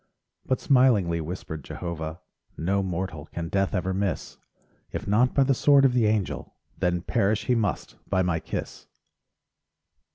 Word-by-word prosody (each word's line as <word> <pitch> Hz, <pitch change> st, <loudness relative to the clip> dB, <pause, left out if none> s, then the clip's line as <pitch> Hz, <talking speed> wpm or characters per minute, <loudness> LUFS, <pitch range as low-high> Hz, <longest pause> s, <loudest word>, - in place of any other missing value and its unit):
But 130 Hz, -, +1 dB
smilingly 115 Hz, -, +3 dB
whispered 80 Hz, -2 st, -6 dB
Jehovah: 80 Hz, 0 st, -5 dB, 0.4 s
"No 95 Hz, +5 st, +1 dB
mortal 90 Hz, -4 st, -4 dB
can 85 Hz, -1 st, -5 dB
death 95 Hz, +1 st, 0 dB
ever 95 Hz, +1 st, -1 dB
miss; 100 Hz, 0 st, -2 dB, 0.5 s
If -, -, -5 dB
not 115 Hz, +5 st, +3 dB
by 140 Hz, -, +5 dB
the 135 Hz, +1 st, +3 dB
sword 140 Hz, +1 st, +5 dB
of 130 Hz, -, +4 dB
the 120 Hz, -3 st, +3 dB
Angel 105 Hz, -2 st, -1 dB, 0.2 s
Then 90 Hz, -1 st, 0 dB
perish 100 Hz, +4 st, +1 dB
he 125 Hz, -, +2 dB
must 110 Hz, -4 st, -1 dB
by 95 Hz, -1 st, +2 dB
my 85 Hz, -2 st, 0 dB
kiss." -, -, -6 dB
95 Hz, 150 wpm, -26 LUFS, 85-115 Hz, 0.5 s, by